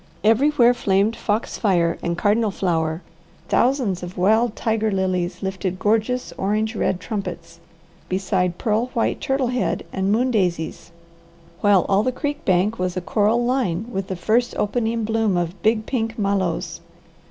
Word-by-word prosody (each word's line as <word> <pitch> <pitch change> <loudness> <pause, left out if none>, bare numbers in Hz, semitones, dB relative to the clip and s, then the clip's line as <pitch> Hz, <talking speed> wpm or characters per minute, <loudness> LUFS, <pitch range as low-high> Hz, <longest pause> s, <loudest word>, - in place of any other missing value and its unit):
Everywhere 240 +2 +4
flamed 205 -1 +1
foxfire 195 -6 0
and 170 0 -2
cardinal 215 +2 +2
flower, 165 -4 -1 0.5
thousands 245 -8 +1
of 180 +1 -8
wild 220 +5 +3
tiger 220 -1 0
lilies 185 -2 -1
lifted 190 -1 -3
gorgeous 220 -1 0
orange 215 +3 0
red 185 - 0
trumpets, 180 -5 -6 0.5
beside 185 -2 0
pearl 220 +2 0
white 230 - 0
turtle 270 -2 0
head 250 0 -1
and 190 +1 0
moon 250 +4 +2
daisies, 175 -6 -1 0.7
while 205 -3 +4
all 195 0 +3
the 255 - 0
creek 290 +3 -4
bank 190 +4 +2
was 185 0 -2
a - - +2
coral 220 +6 +1
line 225 -7 0
with 195 -3 -3
the 190 - -3
first 230 +7 +1
opening 225 +1 0
bloom 220 -3 +1
of 175 +1 -3
big 220 +1 +2
pink 225 -3 -2
mallows. 195 -5 -1
205 Hz, 145 wpm, -22 LUFS, 185-230 Hz, 0.7 s, Everywhere